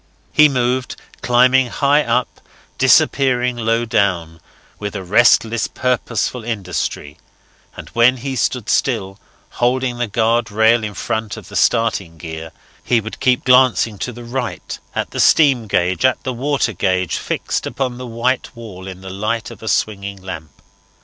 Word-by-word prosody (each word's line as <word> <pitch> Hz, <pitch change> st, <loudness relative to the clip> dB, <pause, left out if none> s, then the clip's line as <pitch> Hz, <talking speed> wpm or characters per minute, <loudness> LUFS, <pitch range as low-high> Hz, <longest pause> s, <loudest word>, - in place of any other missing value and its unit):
He 150 Hz, 0 st, +6 dB
moved, 125 Hz, -1 st, -1 dB, 0.3 s
climbing 125 Hz, +1 st, +4 dB
high 145 Hz, +4 st, +2 dB
up, 120 Hz, 0 st, -1 dB, 0.4 s
disappearing 125 Hz, -2 st, +3 dB
low 115 Hz, 0 st, 0 dB
down, 85 Hz, -7 st, 0 dB, 0.4 s
with 105 Hz, 0 st, -5 dB
a 100 Hz, -, -4 dB
restless, 115 Hz, +3 st, +3 dB
purposeful 125 Hz, -1 st, -2 dB
industry, 90 Hz, -9 st, -4 dB, 0.6 s
and -, -, -9 dB
when 120 Hz, +2 st, +3 dB
he 135 Hz, +2 st, -4 dB
stood 125 Hz, -2 st, -1 dB
still, 100 Hz, -6 st, 0 dB, 0.4 s
holding 125 Hz, 0 st, +1 dB
the 120 Hz, -, 0 dB
guard 115 Hz, +2 st, +1 dB
rail 110 Hz, +2 st, +3 dB
in 105 Hz, -2 st, -5 dB
front 110 Hz, +4 st, -3 dB
of -, -, -11 dB
the -, -, -10 dB
starting 110 Hz, -8 st, +1 dB
gear, 80 Hz, 0 st, -7 dB, 0.3 s
he 120 Hz, -, +2 dB
would 110 Hz, 0 st, -8 dB
keep 125 Hz, -1 st, +2 dB
glancing 125 Hz, -4 st, +3 dB
to 125 Hz, -, -3 dB
the 120 Hz, 0 st, -10 dB
right 120 Hz, -6 st, -5 dB, 0.2 s
at -, -, -2 dB
the -, -, -5 dB
steam 135 Hz, -8 st, +4 dB
gauge, 90 Hz, +1 st, 0 dB
at 130 Hz, -1 st, +2 dB
the 130 Hz, -, -3 dB
water 130 Hz, -2 st, -1 dB
gauge, 95 Hz, -2 st, 0 dB
fixed -, -, -3 dB
upon 125 Hz, -2 st, -3 dB
the 125 Hz, -, -6 dB
white 120 Hz, +3 st, -2 dB
wall 100 Hz, -5 st, -10 dB
in 95 Hz, -1 st, -9 dB
the 95 Hz, 0 st, -8 dB
light 105 Hz, +4 st, -3 dB
of -, -, -12 dB
a 110 Hz, -, -8 dB
swaying 100 Hz, -2 st, -1 dB
lamp. 85 Hz, -6 st, -9 dB
115 Hz, 155 wpm, -18 LUFS, 100-125 Hz, 0.6 s, He